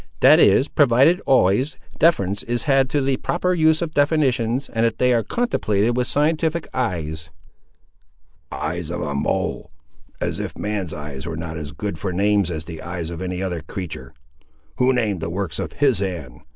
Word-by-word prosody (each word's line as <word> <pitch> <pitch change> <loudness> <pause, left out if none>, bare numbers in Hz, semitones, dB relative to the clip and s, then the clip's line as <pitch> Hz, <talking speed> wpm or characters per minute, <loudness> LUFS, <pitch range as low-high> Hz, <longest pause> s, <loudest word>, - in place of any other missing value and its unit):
"That - - +7
is, 135 - +5
provided 140 +5 +4
always, 130 +3 +3 0.2
deference 100 - +3
is 120 0 -2
had 135 -3 +3
to 145 - +1
the 135 -1 +1
proper 180 +5 0
use 160 -1 +3
of 165 - -4
definitions, 140 -5 +1
and 115 0 -1
that 115 -1 +1
they 125 0 +3
are 115 - +3
contemplated 120 - 0
with 125 0 0
scientific 160 +2 0
eyes." 80 -8 -3 1.2
"Eyes 80 +1 -3
of 85 - -4
a 75 -2 -3
mole! 70 - -2 0.5
as - - -2
if - - -5
man's 105 -6 -3
eyes 75 0 -7
were 80 -1 -4
not 80 0 -5
as 75 -2 -6
good 100 -4 -5
for 95 -2 -2
names 100 0 +2
as 80 -2 -4
the 80 -2 -8
eyes 85 0 -5
of 85 +1 -6
any 90 0 -3
other 90 -4 -3
creatur'! 90 +1 -7 0.6
Who 130 +1 +4
named 110 -7 0
the 80 - -3
works 90 -2 -3
of - - -4
His 135 -7 +2
hand? 85 -10 -5
105 Hz, 180 wpm, -22 LUFS, 85-135 Hz, 1.2 s, That